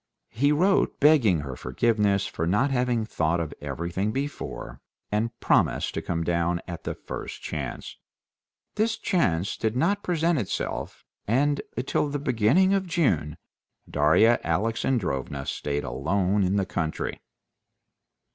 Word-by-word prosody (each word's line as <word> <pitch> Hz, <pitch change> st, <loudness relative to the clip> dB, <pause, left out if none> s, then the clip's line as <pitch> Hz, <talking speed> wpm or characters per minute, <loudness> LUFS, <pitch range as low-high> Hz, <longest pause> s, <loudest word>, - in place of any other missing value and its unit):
He 140 Hz, +6 st, +2 dB
wrote 185 Hz, +6 st, +2 dB
begging 130 Hz, -, +5 dB
her 70 Hz, -3 st, -6 dB
forgiveness 100 Hz, -, +1 dB
for 80 Hz, -, -3 dB
not 110 Hz, +10 st, +2 dB
having 125 Hz, -3 st, +1 dB
thought 85 Hz, -5 st, 0 dB
of 80 Hz, -3 st, -3 dB
everything 85 Hz, +8 st, -2 dB
before, 135 Hz, -, -5 dB, 0.3 s
and 115 Hz, +3 st, -1 dB
promised -, -, +2 dB
to -, -, -2 dB
come 85 Hz, -1 st, -2 dB
down 85 Hz, 0 st, 0 dB
at 85 Hz, -2 st, -7 dB
the -, -, -3 dB
first -, -, -7 dB
chance. -, -, -5 dB, 0.8 s
This 220 Hz, +1 st, 0 dB
chance 95 Hz, -, 0 dB
did 110 Hz, +1 st, -1 dB
not 195 Hz, +10 st, +1 dB
present 170 Hz, -3 st, +1 dB
itself, 105 Hz, -, -4 dB, 0.2 s
and 140 Hz, +6 st, +2 dB, 0.2 s
till 145 Hz, -, 0 dB
the 145 Hz, -, -2 dB
beginning 140 Hz, -, +3 dB
of 195 Hz, -1 st, 0 dB
June 85 Hz, -, +1 dB, 0.5 s
Darya 80 Hz, +11 st, +4 dB
Alexandrovna 85 Hz, -, -1 dB
stayed 75 Hz, 0 st, -2 dB
alone 95 Hz, +10 st, 0 dB
in 95 Hz, +2 st, +1 dB
the 100 Hz, -2 st, +1 dB
country. 80 Hz, -4 st, -3 dB
105 Hz, 130 wpm, -26 LUFS, -, 0.8 s, begging